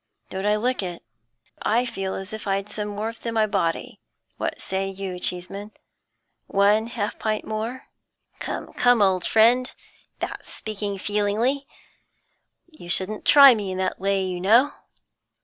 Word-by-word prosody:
Don't 190 +2 -2
I 210 - +4
look 245 +3 0
it? 175 -2 -6 0.6
I 235 +3 +2
feel 195 -5 -3
as 190 +2 -7
if 220 -1 -6
I'd 195 +1 -1
some 210 -1 -4
warmth 220 +2 -5
in 230 -1 -3
my 220 -1 +4
body. 205 +3 -2 0.4
What - - -3
say 190 0 -1
you, 190 -2 -5
Cheeseman? 195 +4 -5 0.7
One 205 +3 +3
half 220 -3 -4
pint 215 -1 -1
more?' 225 +4 -4 0.5
'Come, - - -5
come, 245 -3 +4
old 185 -2 +2
friend; 240 +3 +4 0.5
that's - - -6
speaking 205 -2 -4
feelingly. 210 +8 0 1.0
You 310 - -13
shouldn't 195 +4 -1
try 280 -3 +9
me 205 -4 -3
in - - -4
that 190 - -1
way, 195 0 +1
you 180 -1 -3
know. 235 +9 +5
210 Hz, 150 wpm, -24 LUFS, 195-230 Hz, 1.0 s, try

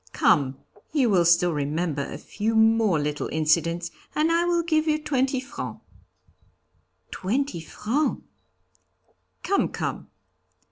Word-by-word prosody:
'Come, 135 -2 +2 0.4
you 260 -7 +3
will 180 -3 +4
still 170 0 +4
remember 150 +1 -1
a - - -5
few 220 +2 -3
more 220 -4 +4
little 145 0 -2
incidents 165 +2 +1 0.2
and 310 +2 +2
I 340 +1 +2
will 345 -1 +1
give 315 -1 +1
you 305 -1 +3
twenty 265 -3 0
francs.' 260 +2 -7 1.3
'Twenty 220 0 -2
francs!' 235 - -2 1.2
'Come, 400 - +1
come.' - - -4
215 Hz, 120 wpm, -25 LUFS, -, 1.3 s, will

